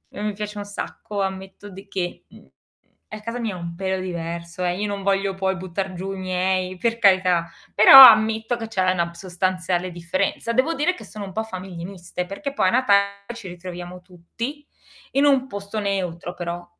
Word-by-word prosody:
E 205 Hz, -, -6 dB
mi 210 Hz, 0 st, -1 dB
piace 210 Hz, +1 st, -6 dB
un 205 Hz, -, -4 dB
sacco, 205 Hz, 0 st, -6 dB
ammetto 190 Hz, +1 st, -5 dB
di 195 Hz, +1 st, -12 dB
che, 185 Hz, -3 st, -4 dB
mhmm, -, -, -17 dB, 0.6 s
è 215 Hz, 0 st, -8 dB
casa 230 Hz, +2 st, -5 dB
mia 215 Hz, -6 st, -3 dB
un 170 Hz, -1 st, -6 dB
pelo 190 Hz, 0 st, -2 dB
diverso, 170 Hz, 0 st, -5 dB
eh, 180 Hz, +2 st, -1 dB
io 210 Hz, -, -1 dB
non 200 Hz, -1 st, -4 dB
voglio 195 Hz, 0 st, +1 dB
poi 190 Hz, 0 st, -1 dB
buttar 185 Hz, +1 st, -4 dB
giù 190 Hz, +2 st, -5 dB
i -, -, -7 dB
miei, 185 Hz, 0 st, -1 dB
per 235 Hz, +3 st, -1 dB
carità, 185 Hz, -4 st, +3 dB, 0.2 s
però 240 Hz, +6 st, +10 dB
ammetto 220 Hz, 0 st, +7 dB
che 225 Hz, -1 st, -6 dB
c'è 185 Hz, -4 st, +1 dB
una 170 Hz, -1 st, -2 dB
sostanziale 185 Hz, 0 st, -2 dB
differenza. 185 Hz, +6 st, -2 dB
Devo 265 Hz, +7 st, +2 dB
dire 325 Hz, +5 st, +1 dB
che -, -, -11 dB
sono 205 Hz, -2 st, -8 dB
un 190 Hz, -, -10 dB
po' 220 Hz, -, -1 dB
famiglie 185 Hz, -4 st, -8 dB
miste, 180 Hz, -1 st, -6 dB
perché 275 Hz, +10 st, -6 dB
poi 185 Hz, -, +2 dB
a -, -, 0 dB
Natale 200 Hz, -6 st, +4 dB, 0.3 s
ci 205 Hz, -6 st, -9 dB
ritroviamo 180 Hz, 0 st, -8 dB
tutti, 230 Hz, -, -8 dB, 0.5 s
in 280 Hz, +2 st, +3 dB
un 270 Hz, -2 st, +3 dB
posto 200 Hz, -1 st, -5 dB
neutro 180 Hz, -4 st, -3 dB
però. 175 Hz, 0 st, -5 dB
190 Hz, 190 wpm, -22 LUFS, 180-210 Hz, 0.6 s, però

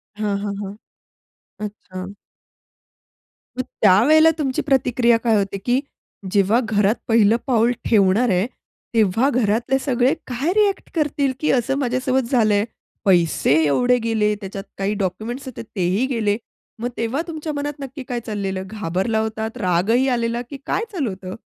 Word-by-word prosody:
हां, 210 Hz, -2 st, -1 dB
हां, 200 Hz, -1 st, -3 dB, 0.8 s
हां.अच्छा. 200 Hz, -2 st, -8 dB, 1.4 s
मग 255 Hz, -, 0 dB, 0.2 s
त्यावेळेला 270 Hz, +12 st, +6 dB
तुमची 270 Hz, -4 st, -1 dB
प्रतिक्रिया 250 Hz, -4 st, +3 dB
काय 230 Hz, -2 st, +3 dB
होती, 195 Hz, 0 st, -1 dB
की 250 Hz, +1 st, +3 dB, 0.5 s
जेव्हा 205 Hz, +3 st, +3 dB
घरात 210 Hz, +1 st, +3 dB
पहिलं 225 Hz, -1 st, +4 dB
पाऊल 235 Hz, -2 st, +3 dB, 0.2 s
ठेवणार 210 Hz, +2 st, +4 dB
आहे, 185 Hz, +3 st, +2 dB, 0.5 s
तेव्हा 225 Hz, +4 st, +3 dB
घरातले 240 Hz, +2 st, +1 dB
सगळे 255 Hz, -1 st, +2 dB
काय 265 Hz, +7 st, -1 dB
रिॲक्ट 410 Hz, -2 st, +1 dB
करतील, 290 Hz, -3 st, +1 dB
की 305 Hz, -, +1 dB
असं 265 Hz, +2 st, +1 dB
माझ्यासोबत 255 Hz, -1 st, 0 dB
झालंय, 215 Hz, -4 st, +3 dB, 0.4 s
पैसे 175 Hz, -7 st, +3 dB
एवढे 245 Hz, -, +3 dB
गेले. 220 Hz, -2 st, +1 dB
त्याच्यात 195 Hz, 0 st, -6 dB
काही 195 Hz, +1 st, -1 dB
डॉक्युमेंट्स 215 Hz, +7 st, -3 dB
होते 255 Hz, -, -7 dB
तेही 190 Hz, +5 st, +1 dB
गेले. 225 Hz, -5 st, 0 dB, 0.4 s
मग 245 Hz, -, -2 dB
तेव्हा 230 Hz, +6 st, -1 dB
तुमच्या 315 Hz, -2 st, -4 dB
मनात 290 Hz, 0 st, -3 dB
नक्की 270 Hz, 0 st, -7 dB
काय 245 Hz, -1 st, -2 dB
चाललेलं? 195 Hz, -3 st, -3 dB
घाबरला 205 Hz, +2 st, -1 dB
होतात. 220 Hz, +1 st, -3 dB
रागही 210 Hz, +6 st, +2 dB
आलेला, 235 Hz, 0 st, -1 dB
की 280 Hz, -, -7 dB
काय 425 Hz, -, 0 dB
चालू 285 Hz, -, -1 dB
होतं? 185 Hz, 0 st, -7 dB
230 Hz, 140 wpm, -21 LUFS, 200-260 Hz, 1.4 s, त्यावेळेला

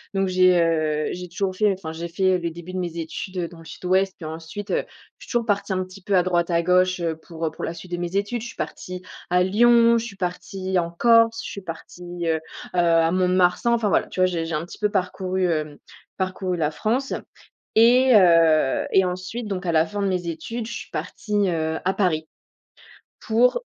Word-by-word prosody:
donc 195 Hz, 0 st, +1 dB
j'ai, 185 Hz, -1 st, +4 dB
heu, 155 Hz, -2 st, +1 dB
j'ai 180 Hz, 0 st, -6 dB
toujours 190 Hz, +1 st, -2 dB
fait, 210 Hz, +1 st, +3 dB
enfin, 180 Hz, -4 st, -7 dB
j'ai 170 Hz, +1 st, -5 dB
fait 185 Hz, +1 st, +1 dB
le 170 Hz, -1 st, -2 dB
début 170 Hz, +2 st, -9 dB
de 185 Hz, -, -2 dB
mes 170 Hz, -2 st, -4 dB
études 170 Hz, +2 st, -4 dB
dans 170 Hz, -, -13 dB
le 165 Hz, -, -14 dB
Sud-Ouest, 190 Hz, +3 st, 0 dB
puis 165 Hz, -, -9 dB
ensuite, 160 Hz, +6 st, -7 dB
heu, -, -, +1 dB, 0.4 s
je -, -, -12 dB
suis -, -, -9 dB
toujours 240 Hz, -2 st, +1 dB
partie 200 Hz, -2 st, 0 dB
un 185 Hz, 0 st, 0 dB
petit 185 Hz, +2 st, -13 dB
peu 195 Hz, +2 st, 0 dB
à 180 Hz, -, +4 dB
droite 175 Hz, -1 st, 0 dB
à 170 Hz, 0 st, +2 dB
gauche 185 Hz, +1 st, +3 dB, 0.3 s
pour, 165 Hz, -1 st, -4 dB
heu, 155 Hz, -, -1 dB
pour -, -, -9 dB
la 165 Hz, -, -3 dB
suite 175 Hz, +2 st, -11 dB
de 175 Hz, -, -2 dB
mes 175 Hz, +2 st, -2 dB
études. 210 Hz, +4 st, -1 dB
Je 240 Hz, -, -6 dB
suis 260 Hz, -, -10 dB
partie 180 Hz, 0 st, -6 dB, 0.3 s
à 180 Hz, +1 st, +3 dB
Lyon, 235 Hz, +4 st, +5 dB
je 225 Hz, -, -5 dB
suis 210 Hz, -4 st, -8 dB
partie 185 Hz, +1 st, -2 dB
en 170 Hz, -1 st, -2 dB
Corse, 230 Hz, +4 st, +4 dB
je -, -, -5 dB
suis 200 Hz, -, -7 dB
partie, 175 Hz, 0 st, -7 dB
heu, 160 Hz, -, +2 dB
heu, -, -, -6 dB, 0.4 s
à 165 Hz, -1 st, +4 dB
Mont-de-Marsan 185 Hz, +4 st, +2 dB
enfin, 225 Hz, -3 st, 0 dB
voilà, -, -, +2 dB
tu -, -, -8 dB
vois? -, -, +6 dB
J'ai 170 Hz, -3 st, -2 dB
j'ai 165 Hz, -, -2 dB
un 155 Hz, +2 st, -2 dB
petit -, -, -12 dB
peu 210 Hz, -1 st, +1 dB
parcouru, 185 Hz, -1 st, -1 dB
hem, 155 Hz, -2 st, -3 dB, 0.4 s
parcouru 185 Hz, -1 st, -2 dB
la 155 Hz, -2 st, 0 dB
France 230 Hz, -, -1 dB, 0.6 s
et 245 Hz, +3 st, +6 dB
heu, 165 Hz, -7 st, +4 dB
et 190 Hz, -, +4 dB
ensuite 185 Hz, +6 st, -4 dB
donc 195 Hz, -2 st, -4 dB
à -, -, +2 dB
la 160 Hz, 0 st, +4 dB
fin 205 Hz, +5 st, -4 dB
de 200 Hz, -, +1 dB
mes 180 Hz, -2 st, -1 dB
études, 220 Hz, +8 st, -4 dB
je 235 Hz, -, -6 dB
suis -, -, -9 dB
partie, 205 Hz, -3 st, -1 dB
heu, 160 Hz, -2 st, -1 dB
à 190 Hz, -, +2 dB
Paris, 175 Hz, -6 st, 0 dB, 1.0 s
pour 250 Hz, -, +3 dB
185 Hz, 220 wpm, -23 LUFS, 170-200 Hz, 1.0 s, vois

